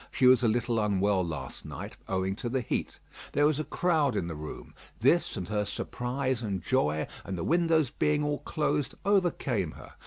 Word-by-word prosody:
She 130 Hz, -, +1 dB
was 125 Hz, -1 st, +7 dB
a 120 Hz, -, +3 dB
little 115 Hz, +1 st, +1 dB
unwell 100 Hz, -2 st, +2 dB
last 80 Hz, -4 st, -5 dB
night, -, -, -7 dB
owing 95 Hz, 0 st, 0 dB
to 120 Hz, -, -3 dB
the 130 Hz, +1 st, 0 dB
heat. 120 Hz, -, -3 dB, 0.4 s
There 145 Hz, -, +4 dB
was 150 Hz, -1 st, +2 dB
a -, -, 0 dB
crowd 155 Hz, -7 st, +1 dB
in 90 Hz, -, 0 dB
the 85 Hz, -, -4 dB
room. 75 Hz, 0 st, -8 dB, 0.3 s
This 135 Hz, +3 st, +3 dB
and 90 Hz, -3 st, -4 dB
her 105 Hz, -1 st, +1 dB
surprise 125 Hz, +4 st, -2 dB
and 100 Hz, -6 st, -3 dB
joy, 80 Hz, -11 st, +1 dB, 0.2 s
and 95 Hz, -1 st, -4 dB
the 85 Hz, -, -3 dB
windows 165 Hz, -5 st, +3 dB
being 150 Hz, 0 st, +1 dB
all 145 Hz, 0 st, 0 dB
closed, 150 Hz, -3 st, -1 dB
overcame 150 Hz, -, +1 dB
her. -, -, -12 dB
120 Hz, 190 wpm, -29 LUFS, 95-150 Hz, 0.4 s, was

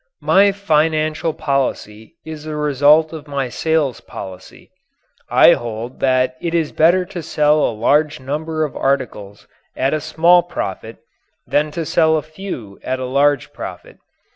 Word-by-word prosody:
My 200 Hz, +1 st, +5 dB
financial 155 Hz, -4 st, 0 dB
policy 130 Hz, -7 st, -3 dB
is 155 Hz, -1 st, -8 dB
the 155 Hz, -1 st, -5 dB
result 150 Hz, +2 st, +3 dB
of 155 Hz, -2 st, -9 dB
my 140 Hz, -3 st, -3 dB
sales 155 Hz, -2 st, -1 dB
policy. 95 Hz, -1 st, -11 dB, 0.6 s
I -, -, +6 dB
hold 120 Hz, +1 st, -6 dB
that 130 Hz, -1 st, +1 dB
it 170 Hz, 0 st, -2 dB
is 160 Hz, -3 st, 0 dB
better 175 Hz, +3 st, +3 dB
to 180 Hz, -2 st, -7 dB
sell 150 Hz, -1 st, +2 dB
a -, -, +1 dB
large 150 Hz, +6 st, +2 dB
number 155 Hz, +4 st, -3 dB
of 150 Hz, -, -4 dB
articles 115 Hz, -7 st, -3 dB, 0.3 s
at 135 Hz, +2 st, 0 dB
a 155 Hz, -, -1 dB
small 170 Hz, +3 st, +4 dB
profit 115 Hz, -, -6 dB, 0.5 s
than 150 Hz, +1 st, +1 dB
to 165 Hz, -, -2 dB
sell 160 Hz, 0 st, +3 dB
a 150 Hz, -, -3 dB
few 155 Hz, -, -8 dB
at 130 Hz, -, -2 dB
a 130 Hz, -, -3 dB
large 140 Hz, +1 st, +1 dB
profit. -, -, -9 dB
150 Hz, 150 wpm, -18 LUFS, 130-160 Hz, 0.6 s, I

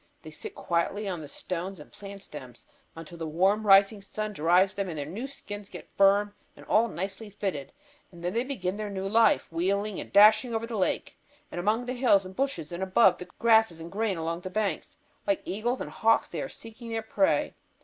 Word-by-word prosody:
They -, -, -9 dB
sit 430 Hz, -2 st, -8 dB
quietly 185 Hz, +5 st, -1 dB
on 180 Hz, -4 st, -3 dB
the 150 Hz, -, -8 dB
stones 180 Hz, +4 st, -5 dB
and 150 Hz, -, -13 dB
plant 200 Hz, -1 st, -9 dB
stems 130 Hz, -5 st, -11 dB, 0.3 s
until 165 Hz, +1 st, -10 dB
the 165 Hz, -, -3 dB
warm 195 Hz, +7 st, +2 dB
rising 200 Hz, +1 st, +6 dB
sun 215 Hz, +1 st, -5 dB
dries 180 Hz, +3 st, +3 dB
them 200 Hz, -2 st, -3 dB
and 160 Hz, -, -5 dB
their 145 Hz, -, -3 dB
new 205 Hz, -, -5 dB
skins 205 Hz, -7 st, -8 dB
get -, -, -11 dB
firm 200 Hz, +1 st, +4 dB, 0.2 s
and -, -, -13 dB
all 225 Hz, +2 st, +3 dB
nicely 195 Hz, +3 st, -5 dB
fitted, 190 Hz, -8 st, -4 dB, 0.4 s
and 170 Hz, -1 st, -13 dB
then 175 Hz, +1 st, -1 dB
they 235 Hz, -, +1 dB
begin 205 Hz, -8 st, -3 dB
their 215 Hz, -1 st, -4 dB
new 195 Hz, -1 st, -3 dB
life, 225 Hz, -2 st, +3 dB
wheeling 195 Hz, +4 st, -1 dB
and -, -, -8 dB
dashing 215 Hz, +3 st, +6 dB
over 225 Hz, +1 st, -1 dB
the 230 Hz, 0 st, -6 dB
lake 190 Hz, -3 st, -1 dB, 0.3 s
and -, -, -5 dB
among 215 Hz, +6 st, +1 dB
the 250 Hz, -, -3 dB
hills 240 Hz, -7 st, +3 dB
and 185 Hz, 0 st, -10 dB
bushes 190 Hz, -, -2 dB
and 175 Hz, +1 st, -5 dB
above 190 Hz, +1 st, +4 dB
the 180 Hz, -, -9 dB
grasses 220 Hz, -7 st, +4 dB
and 165 Hz, +1 st, -8 dB
grain 210 Hz, -2 st, -1 dB
along 165 Hz, +1 st, -3 dB
the 185 Hz, -, -6 dB
banks. 200 Hz, -4 st, -2 dB, 0.3 s
Like 200 Hz, -1 st, +1 dB
eagles 235 Hz, +6 st, -2 dB
and -, -, -5 dB
hawks 225 Hz, 0 st, +2 dB
they -, -, -3 dB
are 270 Hz, -, -4 dB
seeking 230 Hz, -1 st, -11 dB
their 225 Hz, -1 st, -2 dB
prey. 290 Hz, +6 st, +1 dB
200 Hz, 210 wpm, -28 LUFS, 180-220 Hz, 0.4 s, rising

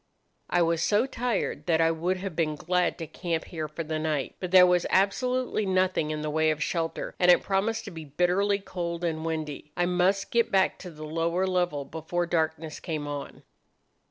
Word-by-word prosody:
"I 175 Hz, 0 st, +3 dB
was 165 Hz, 0 st, +1 dB
so 210 Hz, +4 st, +3 dB
tired 245 Hz, -8 st, -2 dB
that 165 Hz, -2 st, +3 dB
I 165 Hz, 0 st, +4 dB
would 175 Hz, +3 st, -1 dB
have 185 Hz, -2 st, -5 dB
been 155 Hz, -2 st, 0 dB
glad 180 Hz, +3 st, 0 dB
to 165 Hz, -, -5 dB
camp 165 Hz, +1 st, -3 dB
here 160 Hz, -3 st, -5 dB
for 155 Hz, +2 st, -5 dB
the 155 Hz, 0 st, -3 dB
night. 155 Hz, -3 st, -2 dB
But 180 Hz, -, -4 dB
there 185 Hz, 0 st, +8 dB
was 180 Hz, -1 st, +2 dB
absolutely 250 Hz, +5 st, +1 dB
nothing 185 Hz, -4 st, +1 dB
in 155 Hz, 0 st, -3 dB
the 155 Hz, -, -2 dB
way 160 Hz, +1 st, +2 dB
of 155 Hz, 0 st, 0 dB
shelter, 165 Hz, -2 st, -2 dB
and 180 Hz, -, +4 dB
it 175 Hz, -, +6 dB
promised 205 Hz, +4 st, 0 dB
to 200 Hz, -, -7 dB
be 160 Hz, -2 st, -8 dB
bitterly 180 Hz, +7 st, +1 dB
cold 175 Hz, -3 st, -5 dB
and 160 Hz, -2 st, -1 dB
windy. 155 Hz, -2 st, -4 dB
I 175 Hz, -, +2 dB
must 180 Hz, +2 st, +1 dB
get 235 Hz, -1 st, +2 dB
back 190 Hz, -1 st, +2 dB
to 180 Hz, -, -8 dB
the 155 Hz, -2 st, -9 dB
lower 165 Hz, +4 st, 0 dB
level 175 Hz, -6 st, 0 dB
before 160 Hz, +4 st, -3 dB
darkness 160 Hz, -2 st, -1 dB
came 155 Hz, -4 st, -4 dB
on. 145 Hz, -1 st, -6 dB
175 Hz, 200 wpm, -27 LUFS, 160-185 Hz, -, there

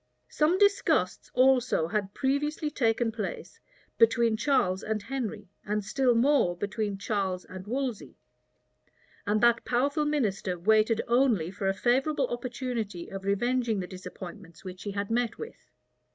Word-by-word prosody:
Some 315 Hz, +4 st, +2 dB
disgusts 405 Hz, 0 st, +2 dB
also 255 Hz, -9 st, +3 dB
had 200 Hz, 0 st, -2 dB
previously 295 Hz, +3 st, -1 dB
taken 230 Hz, -3 st, +1 dB
place 215 Hz, -3 st, -6 dB, 0.4 s
between 230 Hz, 0 st, +4 dB
Charles 215 Hz, -7 st, +1 dB
and 220 Hz, 0 st, -2 dB
Henry, 225 Hz, -3 st, -5 dB, 0.2 s
and 210 Hz, 0 st, -2 dB
still 255 Hz, +1 st, +2 dB
more 235 Hz, -8 st, +3 dB
between 205 Hz, +1 st, -3 dB
Charles 195 Hz, -3 st, -2 dB
and 185 Hz, +1 st, -10 dB
Wolsey; 255 Hz, -2 st, -3 dB, 1.1 s
and 210 Hz, +1 st, +2 dB
that 235 Hz, -1 st, +4 dB
powerful 280 Hz, +5 st, +1 dB
minister 205 Hz, -11 st, -1 dB
waited 220 Hz, +4 st, +3 dB
only 235 Hz, -9 st, +2 dB
for 195 Hz, 0 st, -3 dB
a 195 Hz, -, +1 dB
favorable 265 Hz, +6 st, +1 dB
opportunity 240 Hz, -6 st, -4 dB
of 195 Hz, 0 st, -7 dB
revenging 235 Hz, +2 st, +1 dB
the 185 Hz, -, -3 dB
disappointments 180 Hz, -1 st, -10 dB
which 185 Hz, 0 st, -8 dB
he 205 Hz, -, -4 dB
had 200 Hz, +1 st, -3 dB
met 235 Hz, -1 st, 0 dB
with. 455 Hz, +1 st, -10 dB
225 Hz, 140 wpm, -28 LUFS, 200-255 Hz, 1.1 s, between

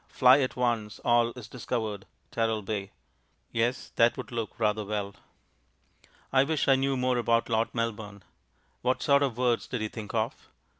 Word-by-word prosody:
"Fly 130 Hz, +1 st, +6 dB
at 130 Hz, -2 st, -1 dB
once; 120 Hz, -4 st, -1 dB
all 120 Hz, 0 st, +4 dB
is 125 Hz, -4 st, -9 dB
discovered 110 Hz, -5 st, -4 dB, 0.2 s
Teralbay." 110 Hz, -3 st, -1 dB, 0.6 s
Yes, 120 Hz, +2 st, -1 dB
that 115 Hz, 0 st, +4 dB
would -, -, -7 dB
look 115 Hz, -2 st, -4 dB
rather 105 Hz, -1 st, +1 dB
well. 100 Hz, -1 st, -3 dB, 1.2 s
I 135 Hz, 0 st, +6 dB
wish 155 Hz, +1 st, 0 dB
I 135 Hz, -, +6 dB
knew 135 Hz, 0 st, 0 dB
more 125 Hz, -1 st, +1 dB
about 115 Hz, 0 st, +1 dB
Lord 115 Hz, 0 st, +1 dB
Melbourne. 105 Hz, -3 st, -3 dB, 0.6 s
What 125 Hz, +1 st, 0 dB
sort 140 Hz, -1 st, +4 dB
of 130 Hz, -5 st, 0 dB
words 125 Hz, -2 st, +1 dB
did 125 Hz, -, -3 dB
he 110 Hz, 0 st, -2 dB
think 110 Hz, -1 st, -7 dB
of? 110 Hz, 0 st, -2 dB
115 Hz, 160 wpm, -28 LUFS, 110-125 Hz, 1.2 s, Fly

